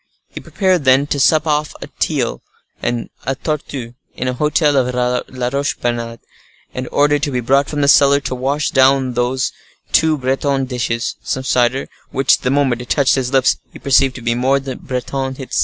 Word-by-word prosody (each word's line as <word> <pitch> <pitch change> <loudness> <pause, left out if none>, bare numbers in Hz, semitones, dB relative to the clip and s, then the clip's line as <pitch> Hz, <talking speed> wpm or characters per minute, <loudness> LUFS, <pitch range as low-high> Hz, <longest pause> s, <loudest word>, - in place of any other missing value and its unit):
He - - -8
prepared, 185 -5 0
then, 130 +1 +4
to 145 0 -2
sup 155 +3 +3
off 150 -1 -1
a - - -7
teal - - -1 0.4
and 120 -1 -3
a 135 +3 -2
torteau, 135 -5 -4 0.2
in 130 - -3
a 125 - 0
hotel 150 +2 +1
of 125 -2 +1 0.3
La 125 -1 -3
Roche 140 0 -1
Bernard, 115 -1 -3 0.5
and 130 0 -5
ordered 145 0 +2
to 150 - 0
be 125 -3 -1
brought 135 +4 +2
from 150 -1 -2
the 140 - +2
cellar, 140 0 +6
to 135 - -4
wash 140 +4 -1
down 130 -1 +3
these 125 +2 -1 0.4
two 160 -1 +3
Breton 135 +1 0
dishes, 120 -2 -3
some 130 - -3
cider, 125 +1 +1 0.2
which, 135 0 +2
the - - -1
moment 135 -3 +1
it 125 - -10
touched 140 -2 +3
his 130 -2 -1
lips, 135 -2 +3
he - - -11
perceived 135 -1 +2
to 125 - -9
be 120 0 +1
more 130 +3 +2
Breton 130 0 -4
still. 135 - -7
135 Hz, 190 wpm, -17 LUFS, 125-140 Hz, 0.5 s, cellar